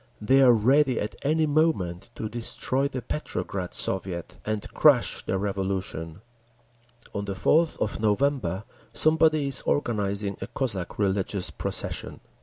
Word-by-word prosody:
They 135 +6 +4
are 130 -2 +8
ready 130 +3 +3
at 105 - -3
any 155 +3 +2
moment 135 - 0
to 110 - -4
destroy 120 +4 -1
the 130 -3 -5
Petrograd 95 -10 -4
Soviet 90 -2 -1
and 110 -1 -2
crush - - +4
the 95 - -1
Revolution…. 95 -3 -3 0.9
On 100 -1 -3
the 100 -1 -4
4th 155 - +3
of 105 - -1
November 110 -3 +1 0.3
somebody 155 -2 +3
is 135 - +2
organising 100 -6 -1
a - - -4
Cossack 100 -10 -3
religious 100 -1 0
procession. - - -4
105 Hz, 130 wpm, -26 LUFS, 95-140 Hz, 0.9 s, are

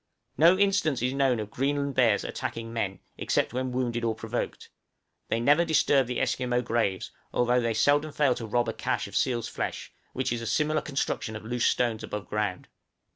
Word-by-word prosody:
No 170 +4 +6
instance 195 - +2
is 125 +1 +1
known 135 -3 +2
of 105 -1 -5
Greenland 140 +1 -1
bears 120 -5 +3
attacking 115 0 -5
men, 100 -5 -3 0.2
except - - 0
when 130 0 -2
wounded 120 -2 -1
or 115 -1 0
provoked; 115 +2 -4 0.6
they 115 - +1
never 145 +8 +4
disturb 145 -5 +3
the 125 - -2
Esquimaux 125 -1 0
graves, 110 -5 -1 0.2
although 125 0 +2
they 115 -1 0
seldom 145 +6 +3
fail 140 -3 +2
to 115 -2 -6
rob 120 +2 +1
a - - -1
câche - - -2
of - - -10
seal's 120 -3 +1
flesh, - - -5 0.2
which 130 -1 -1
is 120 - -3
a 115 - -5
similar 155 +3 +1
construction 135 -6 -2
of 110 - -8
loose 120 +1 +1
stones 120 -3 +1
above 105 -1 -5
ground. 105 -3 -2
125 Hz, 185 wpm, -27 LUFS, 115-140 Hz, 0.6 s, No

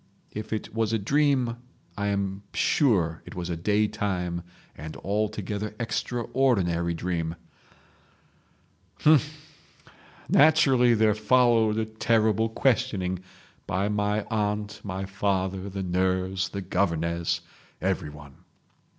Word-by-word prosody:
If 105 0 -6
it 110 - -4
was 115 0 0
a - - +3
dream, 130 +1 +1 0.4
I 100 0 -2
am 100 -1 -1
sure 90 - +2
it - - -11
was 90 -1 -4
a - - -1
day 105 +5 +2
time 90 -5 -2 0.3
and 80 +2 -8
altogether 105 +1 -2
extraordinary 115 -7 0
dream...... 85 -1 -2 1.7
H'm!—naturally 150 -3 +2
there 110 -1 +4
followed 110 0 +3
a 110 - +1
terrible 110 0 +1
questioning, 110 -7 0 0.5
by 95 +3 0
my 105 0 0
aunt, 105 -1 -1
my 95 -1 -4
father, 95 -1 -1
the 95 0 -4
nurse, 95 +1 0
the 100 - -5
governess—everyone 85 -5 -3
105 Hz, 100 wpm, -26 LUFS, 90-115 Hz, 1.7 s, there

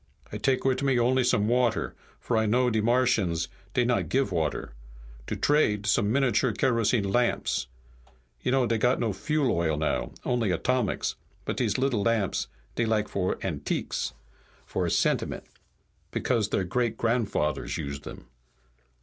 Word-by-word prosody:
"I 105 - -4
take 130 +4 +1
wit' 130 0 +2
me 135 -2 +2
only 125 +2 +3
some 105 -4 +2
water, 120 0 +1 0.3
for 120 - -2
I 110 -1 +2
know 125 +3 +3
de 110 -1 +1
Martians 110 -8 +2 0.3
dey 125 - +3
not 125 0 +1
give 135 -5 +1
water. 80 -7 -2 0.5
To - - -2
trade, 105 -9 +2
some 105 0 +2
miniature 130 -2 +2
kerosene 115 -1 +2
lamps. 120 - 0 0.7
You - - 0
know 130 -1 +3
dey 115 -1 0
got 125 +3 +2
no 115 -4 0
fuel 145 +4 0
oil 80 -4 +1
now, 75 0 -1
only 120 -4 +1
atomics, 125 +7 0 0.3
but - - -3
dese 110 -5 +1
little 130 -5 +1
lamps 110 -3 0 0.3
dey 115 - 0
like 110 -1 +1
for 95 -2 -1
antiques, - - -2 0.5
for - - -1
sentiment, - - 0 0.7
because 115 -5 0
their 95 - 0
great 115 +4 -1
grandfathers 115 -10 0
used 70 0 -5
dem. - - -10
115 Hz, 150 wpm, -27 LUFS, 100-125 Hz, 0.7 s, only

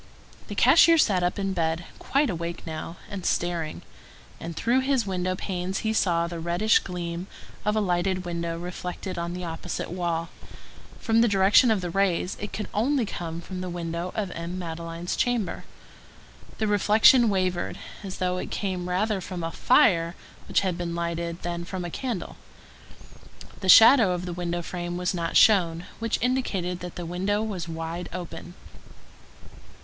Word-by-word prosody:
The 205 - -6
cashier 330 +9 +6
sat 200 - +3
up 175 0 0
in 195 -1 -1
bed, 165 -1 -1
quite 280 -3 +1
awake 170 0 -5
now, 160 +1 -6
and 200 -4 -6
staring; 170 -3 -1 0.6
and 165 0 -6
through 240 +9 +2
his 265 -3 +1
window 185 -1 -1
panes 185 0 -3
he 220 - +1
saw 170 -5 +2
the 170 0 -5
reddish 175 +6 +3
gleam 175 0 -5 0.4
of 210 0 +1
a - - +3
lighted 185 0 0
window 170 -1 -3
reflected 180 +1 -5
on 170 0 -3
the 180 0 -5
opposite 165 -1 -5
wall; 170 -2 -2 0.7
from 225 -1 +2
the 235 - +5
direction 200 +4 +5
of 215 -4 +2
the 175 -1 -4
rays, 190 -1 +1
it 210 - -5
could 210 - -4
only 250 +3 +1
come 170 -4 -5
from 185 +1 -6
the 185 - -4
window 170 +1 -4
of 205 -4 -2
M. 170 +2 -5
Madeleine's 165 0 -4
chamber. 245 -5 -1 0.9
The 220 - 0
reflection 215 +3 +5
wavered, 185 -3 -1 0.3
as 190 -2 -6
though 180 0 -1
it - - -4
came 185 -3 -3
rather 195 +2 0
from 180 -1 -6
a 165 - -2
fire 175 - +3 0.3
which - - +2
had 185 -3 -2
been 170 -1 -3
lighted 170 0 -3
than 170 0 -3
from 180 0 -5
a 175 - -5
candle. 240 -4 -4 1.2
The 190 - -3
shadow 225 -2 +8
of 180 0 -4
the 175 - -4
window 175 0 -3
frame 175 0 -4
was 180 +1 -1
not 170 -2 0
shown, 175 -5 +4
which 230 -1 0
indicated 195 -9 -1
that 180 -1 -7
the 175 - -5
window 195 +5 -1
was 190 -6 -4
wide 165 +2 -5
open. 175 0 -7
180 Hz, 165 wpm, -26 LUFS, 170-205 Hz, 1.2 s, shadow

